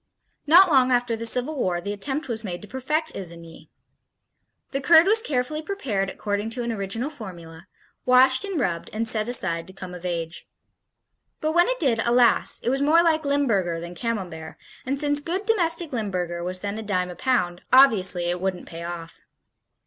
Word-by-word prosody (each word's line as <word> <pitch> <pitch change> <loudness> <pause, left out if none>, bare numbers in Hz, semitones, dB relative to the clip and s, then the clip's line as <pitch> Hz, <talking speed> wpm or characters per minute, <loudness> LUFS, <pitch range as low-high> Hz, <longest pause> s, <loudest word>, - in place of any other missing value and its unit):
Not 355 +5 +8
long 260 -5 +3
after 245 -1 +1
the 230 +1 -2
Civil 250 +6 +1
War 180 -6 0
the 200 +4 -4
attempt 275 +9 -4
was 230 -2 -2
made 180 -1 -6
to - - -10
perfect 300 +7 -2
Isigny. 170 -3 -9 1.0
The 275 - -2
curd 325 +3 +6
was 435 +3 +4
carefully 305 - -2
prepared 250 - -3
according 205 +2 -3
to 245 - -2
an 235 - -2
original 225 +6 -3
formula, 170 - -10 0.4
washed 260 +4 +4
and 390 -5 -3
rubbed 170 -9 -2
and 225 +1 -1
set 220 0 +2
aside 175 -8 0
to 190 - -12
come 185 -1 -9
of 180 -1 -10
age. 170 -2 -4 0.9
But 310 - -1
when 345 +2 +4
it - - -1
did, 245 -7 +2
alas, 240 +1 +3
it 240 - 0
was 270 +1 -1
more 320 +4 +4
like 320 -2 +1
Limburger 215 -12 0
than 170 +1 -8
Camembert, 180 -8 -5 0.3
and 275 +1 -1
since 290 0 +1
good 355 +7 -3
domestic 340 -7 0
Limburger 180 -6 -3
was 185 +1 -3
then 205 +1 -4
a - - -4
dime 185 -4 -2
a - - -9
pound, 180 -6 -1
obviously 210 -9 +5
it 175 +1 -2
wouldn't 190 -1 -3
pay 165 0 -9
off. 170 -1 -8
230 Hz, 185 wpm, -24 LUFS, 180-285 Hz, 1.0 s, Not